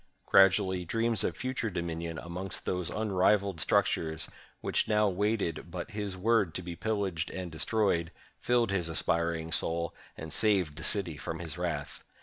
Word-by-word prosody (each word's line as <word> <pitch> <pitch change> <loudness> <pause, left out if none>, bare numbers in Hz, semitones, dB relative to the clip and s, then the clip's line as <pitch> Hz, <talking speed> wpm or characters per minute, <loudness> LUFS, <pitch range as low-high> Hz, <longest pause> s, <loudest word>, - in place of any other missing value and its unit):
Gradually, 95 -1 +5
dreams 115 +5 +1
of - - -1
future 130 -3 -2
dominion 85 -3 -3
amidst 90 +3 -6
those 90 -2 -1
unrivaled 100 -3 +2
structures, 80 +1 +1 0.3
which - - 0
now 105 0 +3
waited 100 -4 -1
but 90 +6 -6
his 105 -3 -4
word 105 -3 +2
to 90 - -4
be 85 0 -6
pillaged 100 -4 -1
and 90 -2 -5
destroyed, 85 0 +1 0.3
filled 120 -3 +2
his 90 -4 0
aspiring 80 0 0
soul, 85 +1 0 0.2
and 80 0 -6
saved 95 -9 +3
the - - -5
city 90 -8 +1
from 80 - -4
his 80 -3 -5
wrath. - - -3
90 Hz, 150 wpm, -30 LUFS, 85-105 Hz, 0.3 s, Gradually